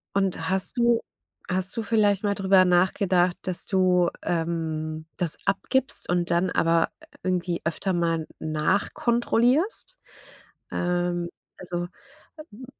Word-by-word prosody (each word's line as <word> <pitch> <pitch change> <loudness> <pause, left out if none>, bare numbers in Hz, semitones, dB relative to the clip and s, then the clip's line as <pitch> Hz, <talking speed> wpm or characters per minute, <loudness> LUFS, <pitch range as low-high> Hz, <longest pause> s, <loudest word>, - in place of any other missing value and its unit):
Und 190 -4 0
hast 190 +6 +1
du 235 -1 +3 0.5
hast 185 +1 -1
du 230 - -1
vielleicht 205 -2 +2
mal 205 -1 +1
drüber 190 -1 +4
nachgedacht, 180 0 +2
dass 185 -2 -3
du, 180 -2 +3
ähm, 160 -2 -2
das 170 -4 +2
abgibst 245 +6 -1
und 175 -1 0
dann 175 +2 +2
aber 165 -1 +2
i - - -19
irgendwie 180 -1 -1
öfter 170 +3 -1
mal 165 -2 0
nachkontrollierst? 235 - +1 0.7
Ähm, 175 -1 -1 0.3
also, 175 -1 -4 0.6
hm, 235 +5 -11
180 Hz, 115 wpm, -25 LUFS, 170-200 Hz, 0.7 s, drüber